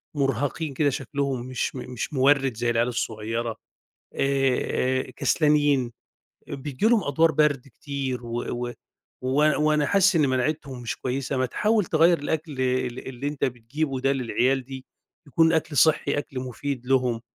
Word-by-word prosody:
مُرهَقين 140 +3 -1
كده 145 +1 +2
شكلهم 135 -1 -3
مش 130 +1 -3
م - - -5
مش 125 - -4
مورِّد 135 -2 +3
زي 120 +1 0
العيال 120 +1 +2
الصغيرة، 115 -1 -3 0.6
آآ 130 -1 0
كسلانين، 145 -3 +2 0.6
بييجي 140 +6 -4
لهم 230 -4 +4
أدوار 160 +3 +3
برْد 145 -3 +1
كتير 135 -1 -5
و 120 +1 -3
و 120 0 -3 0.5
و 130 - -2
وأنا 150 +2 +3
وأنا 150 -1 +2
حاسس 195 +2 +4
إن 150 -4 +3
مناعتهم 130 0 -2
مش 115 - -4
كويسة، 135 +1 -2
ما 130 - +2
تحاول 210 - +1
تغيّر 165 +2 +4
الأكل 155 +2 -3
ال 130 -1 -1
اللي 130 +2 -5
أنت 145 -1 -4
بتجيبه 130 +3 -3
ده 135 +1 +2
للعيال 130 0 0
دي 130 -1 -8 0.4
يكون 160 +3 +3
أكْل 155 -3 0
صِحّي، 160 -2 +3
أكْل 135 -2 -4
مفيد 130 0 -5
لهم." 125 -3 +1
135 Hz, 150 wpm, -25 LUFS, 125-150 Hz, 0.6 s, لهم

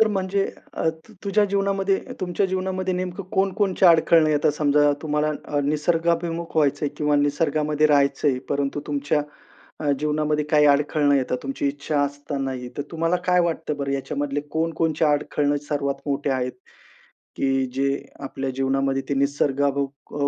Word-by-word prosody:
तर 220 - +5
म्हणजे 195 -1 0 0.3
अ, 160 - 0 0.4
तुझ्या 205 +1 +3
जीवनामध्ये 195 -1 +1 0.2
तुमच्या 185 +2 0
जीवनामध्ये 185 0 -2
नेमकं 180 +1 -3
कोणकोणच्या 190 -1 +3
अडखळणं 160 -1 +5
येतात. 150 0 +3
समजा, 145 -1 +3
तुम्हाला 150 0 0
अ, 145 - -1
निसर्गाभिमुख 165 +2 0
व्हायचंय 145 -1 +2
किंवा 150 -1 +2
निसर्गामध्ये 150 +1 +1
राहायचंय, 140 -2 +2
परंतु 140 +1 -1
तुमच्या 145 0 0 0.6
अ, 150 -2 0
जीवनामध्ये 150 0 0
काही 150 -1 +5
अडखळणं 145 0 +3
येतात 125 -1 0
तुमची 135 +1 -2
इच्छा 145 +1 -2
असतानाही, 135 -3 -4
तर - - -1
तुम्हाला 165 +1 0
काय 180 0 +4
वाटतं 160 -3 -2
बरं 140 -1 -2
याच्यामधले 140 +1 -2
कोणकोणचे 160 -1 0
अडखळणं 145 0 +1
सर्वात 140 -2 -1
मोठे 140 0 -1
आहेत, 125 -1 -1 0.8
की 135 -1 +1
जे 140 +1 +1 0.3
आपल्या 135 0 -4
जीवनामध्ये 135 0 0
ते - - +1
निसर्गाभिमुख 140 0 -1
150 Hz, 135 wpm, -23 LUFS, 140-165 Hz, 0.8 s, तर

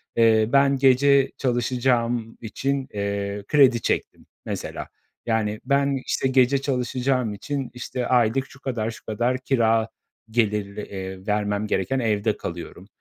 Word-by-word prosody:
eee, 110 -1 +4
"Ben 140 0 +4
gece 135 +1 +4
çalışacağım 120 -2 0
için, 135 +4 -2
eee, 100 0 -3
kredi 130 -5 +5
çektim," - - -2 0.2
mesela. - - -5 0.4
Yani, 110 -2 -1
ben, 140 -1 +2
işte, - - 0
gece 130 +1 +4
çalışacağım 125 -3 -1
için, 135 +5 -4
işte, 125 0 -4
aylık 125 +1 +2
şu 130 - -16
kadar 115 -5 -2
şu 115 - -13
kadar 120 +4 0
kira 115 -4 +1 0.4
gelirli, 105 -3 0
eee, 95 -1 -7
vermem 105 0 0
gereken 105 +7 0
evde 110 -2 0
kalıyorum. 85 +2 -7
120 Hz, 130 wpm, -24 LUFS, 105-130 Hz, 0.4 s, kredi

